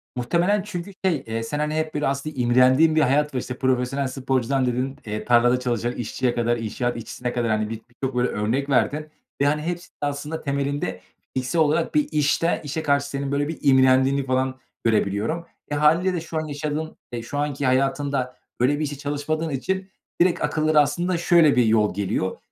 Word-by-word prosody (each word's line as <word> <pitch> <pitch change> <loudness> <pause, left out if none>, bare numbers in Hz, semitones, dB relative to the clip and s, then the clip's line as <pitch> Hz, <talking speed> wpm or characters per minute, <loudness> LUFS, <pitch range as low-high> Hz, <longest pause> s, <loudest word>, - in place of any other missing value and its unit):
Muhtemelen 175 +11 +1
çünkü 200 -1 -6
şey, 165 -7 +1
eee, 115 0 -2
sen, 145 +6 -3
hani, 150 +1 -1
hep, 155 0 -1
böyle, 150 0 0
aslında 140 +2 -3
imrendiğin 130 +6 +4
bir 155 - +4
hayat 150 +2 +2
var, - - +1
işte, 125 0 -6
profesyonel 130 +1 0
sporcudan 130 0 0
dedin, 125 +2 -1
eee, 105 0 -4
tarlada 120 +1 +4
çalışan 120 -1 -1
işçiye 120 +1 -2
kadar, 120 0 +1
inşaat 120 +2 -2
işçisine 120 +2 -5
kadar, 120 -2 0
hani, 110 0 0
bi 115 - -3
bi 110 - -11
birçok 130 +2 -4
böyle 125 0 +2
örnek 120 +7 -1
verdin 145 +4 +1 0.3
ve, - - +4
hani, 150 +1 +2
hepsi 175 +2 -4
de - - -79
aslında 145 +2 -3
temelinde 140 -6 -2 0.3
fiziksel 130 +6 0
olarak 155 +2 +1
bir 300 -1 +3
işte 150 +3 +1
işe 155 +2 -3
karşı 140 0 +1
senin 140 0 -3
böyle 145 +1 0
bir 160 - -4
imrendiğini 130 0 +4
falan 130 0 0 0.2
görebiliyorum. 110 +9 0 0.3
E, - - 0
hâliyle 165 +5 +3
de 175 - -2
şu 160 -1 -5
an 155 - -1
yaşadığın, 150 +2 -4
eee, 120 - -4
şu 125 +5 -6
anki 145 -1 -1
hayatında 135 0 0 0.2
böyle 145 +4 +2
bir - - 0
işte 145 -2 -3
çalışmadığın 145 +3 -2
için 190 +8 -2 0.3
direkt 175 0 +3
akıllara 155 +1 +2
aslında 175 +5 0
şöyle 170 -4 +5
bir 125 - +4
yol 110 -2 +3
geliyor; 95 -1 -2
140 Hz, 190 wpm, -23 LUFS, 125-155 Hz, 0.3 s, şöyle